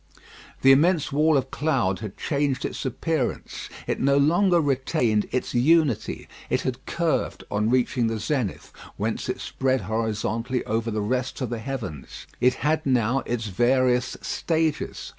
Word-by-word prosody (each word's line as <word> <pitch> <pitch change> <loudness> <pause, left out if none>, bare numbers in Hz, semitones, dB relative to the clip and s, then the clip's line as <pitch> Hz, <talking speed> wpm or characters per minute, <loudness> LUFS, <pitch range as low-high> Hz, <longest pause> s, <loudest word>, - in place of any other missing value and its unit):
The 135 - +8
immense 155 +3 +3
wall 155 +2 +3
of 130 0 -2
cloud 125 -11 0
had 105 -3 -7
changed 140 -3 -1
its - - -3
appearance. 130 +1 -3 0.2
It - - -2
no 140 +1 +3
longer 175 +5 +4
retained 130 -6 +1
its 130 - -2
unity. 145 0 +2 0.2
It - - +1
had 130 0 -3
curved 170 -2 -1
on 105 +2 +1
reaching 125 -1 +2
the 115 0 -1
zenith, 125 -5 -2 0.2
whence - - -2
it - - -2
spread 130 -1 0
horizontally 115 +2 -2
over 115 +1 -1
the 110 -1 -2
rest 125 +3 -2
of 125 -2 -2
the 120 - -2
heavens. 115 - -6
It 125 +1 +3
had 155 +1 +2
now 125 -1 +2
its 120 -2 -2
various 125 +4 +2
stages. 160 -2 -1
130 Hz, 150 wpm, -25 LUFS, 115-145 Hz, 0.2 s, The